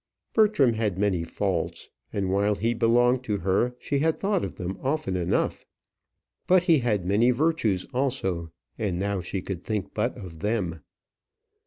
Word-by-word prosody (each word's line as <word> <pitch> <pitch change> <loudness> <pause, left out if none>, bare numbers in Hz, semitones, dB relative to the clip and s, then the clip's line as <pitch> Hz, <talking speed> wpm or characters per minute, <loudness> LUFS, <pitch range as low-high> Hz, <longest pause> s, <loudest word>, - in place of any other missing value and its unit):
Bertram 210 - +4
had 110 -4 -1
many 95 -4 +1
faults, 85 - -2 0.2
and 95 -2 -1
while 100 +2 +2
he 115 +4 0
belonged 120 +2 +3
to 105 -3 0
her, 100 +7 +1
she 140 +2 -1
had 160 +2 +1
thought 200 -2 +1
of - - -4
them 90 +2 -5
often 135 -9 -1
enough; 90 -2 0 0.8
but 185 -1 +5
he 165 -5 +4
had 105 -7 0
many 105 +6 +3
virtues 125 - +1
also, 95 -11 -1 0.3
and 100 -5 -1
now 100 +1 -1
she 90 +1 -4
could 90 -3 -5
think 105 -3 -3
but 115 +4 -1
of 90 -5 -9
them. 95 -5 -1
105 Hz, 160 wpm, -26 LUFS, 95-125 Hz, 0.8 s, but